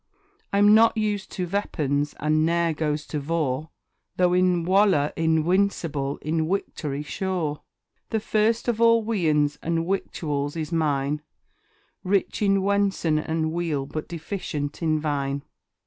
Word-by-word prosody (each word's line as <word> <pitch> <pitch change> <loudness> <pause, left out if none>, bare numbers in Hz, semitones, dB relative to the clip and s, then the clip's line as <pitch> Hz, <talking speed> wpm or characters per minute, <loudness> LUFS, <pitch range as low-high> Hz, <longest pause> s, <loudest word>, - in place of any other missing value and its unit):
I'm 205 +1 +5
not 225 +1 +5
used 210 -2 -1
to 180 - -2
Veapons, 150 -7 -1
and 155 +1 +2
ne'er 170 0 +2
goes 150 0 -2
to 150 - -3
Vor; 155 -1 -1 0.5
Though 180 -1 +3
in 180 -2 +2
Walour 185 -6 +3
inwincible 160 -3 +1
in 160 +1 0
Wictory 150 -6 -3
sure; 175 -5 -2 0.5
The 220 - 0
first 220 +2 +1
of 230 -1 0
all 230 -1 +5
Wiands 155 -9 +1
and 165 0 -1
Wictuals 150 -6 -2
is 155 0 -4
mine 150 -2 0 0.8
Rich 195 +2 0
in 195 -2 +3
Wen'son 195 -6 +1
and 160 0 -1
Weal, 160 -5 -1
but 155 +2 -5
deficient 160 -4 -5
in 155 -2 +1
Vine. 140 -2 -2
165 Hz, 130 wpm, -25 LUFS, 150-195 Hz, 0.8 s, I'm